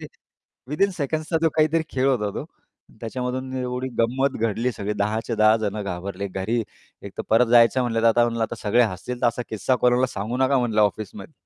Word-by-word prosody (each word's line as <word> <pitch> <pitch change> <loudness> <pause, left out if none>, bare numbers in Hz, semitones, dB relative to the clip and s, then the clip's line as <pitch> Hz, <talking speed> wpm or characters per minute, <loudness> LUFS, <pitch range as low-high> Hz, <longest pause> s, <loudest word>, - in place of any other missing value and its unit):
ते - - -7 0.6
विथिन 175 +8 +1
सेकंडचा 155 +2 -1
जो 165 - +5
काहीतरी 155 +1 +3
खेळ 130 0 0
होता 110 -6 +1
तो, - - -4 0.6
त्याच्यामधून 125 +2 -4
एवढी 125 0 -3
गंमत 130 +4 +1
घडली 115 +3 0
सगळी, 105 -1 -3
10 105 +2 -1
च्या, 115 - -2
10 110 +1 +5
जण 105 -1 -3
घाबरले. 100 +1 -4
घरी 100 +6 -1 0.4
एकतर 100 - -6
परत 115 +2 +5
जायचं 120 +2 +5
म्हटलं, 115 -2 0
तर 115 - +3
आता 120 +1 +4
म्हणलं 115 -1 -1
आता 110 - -2
सगळे 115 +4 +3
हसतील, 115 +4 -3
तर - - +5
असा 120 +1 0
किस्सा 110 +4 0
कोणाला 125 +1 +3
सांगू 110 +1 -4
नका 130 +1 +2
म्हणलं 115 -4 +1
ऑफिसमध्ये. 105 - -2
120 Hz, 195 wpm, -23 LUFS, 105-130 Hz, 0.6 s, जो